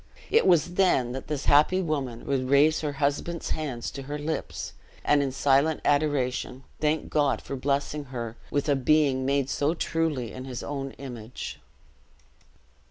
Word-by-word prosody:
It 455 - +4
was 175 0 +4
then 175 -10 +3
that 130 +1 -6
this 150 -2 -3
happy 150 +6 +5
woman 140 -9 -2
would 130 -2 -1
raise 145 +3 +5
her 150 -2 -2
husband's 145 +4 -1
hands 135 -7 -3
to 140 - -7
her 145 +2 -5
lips, 85 - -4 0.3
and 145 -1 +4
in 135 -2 -1
silent 140 +3 +3
adoration, 140 -3 0 0.2
thank 155 0 0
God 145 -3 +2
for 140 - -6
blessing 140 +2 -1
her 120 -4 -5
with 145 +1 -1
a 145 - +4
being 135 -1 +2
made 140 -1 +1
so 145 +4 0
truly 160 -8 -1
in 130 0 -7
his 125 -2 -5
own 135 -2 -4
image. 125 -3 -7
140 Hz, 160 wpm, -27 LUFS, 130-150 Hz, 0.3 s, happy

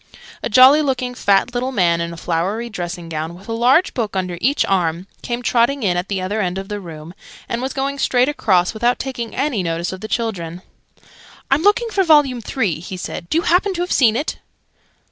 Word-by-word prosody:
A - - -2
jolly 260 +6 +7
looking, 255 -3 -1
fat 200 0 +2
little 250 +2 -1
man, 170 -7 +2
in 170 0 -3
a 170 - -9
flowery 190 +9 -2
dressing 175 -2 -5
gown, 160 +1 -4
with 190 +4 -15
a - - -5
large 255 +10 +3
book 220 -5 -3
under 180 -2 -2
each 275 +4 +2
arm, 175 -2 0 0.2
came 240 0 -4
trotting 240 +2 +2
in 180 -4 +1
at 175 +2 -2
the 195 -1 -2
other 200 +4 -2
end 180 -1 -2
of 195 0 -6
the 205 0 -4
room, 165 -2 -10 0.3
and 235 - -3
was 260 +1 -2
going 275 +1 -3
straight 250 -1 +2
across 200 -11 +1
without 240 +3 +1
taking 245 -4 -5
any 275 -8 0
notice 170 +1 -2
of 185 - -8
the 215 - -5
children. 185 -7 -3 0.9
"I'm 275 +3 +4
looking 415 +5 +3
for 390 -2 +2
Vol. 310 -4 +6 0.2
Three," 210 - -1
he 180 +2 -7
said. 170 -1 -6
"Do - - +1
you 335 - +1
happen 370 +4 +2
to 345 - -2
have 355 - -3
seen 225 -5 +4
it?" 290 +6 -3
220 Hz, 215 wpm, -19 LUFS, 180-260 Hz, 0.9 s, jolly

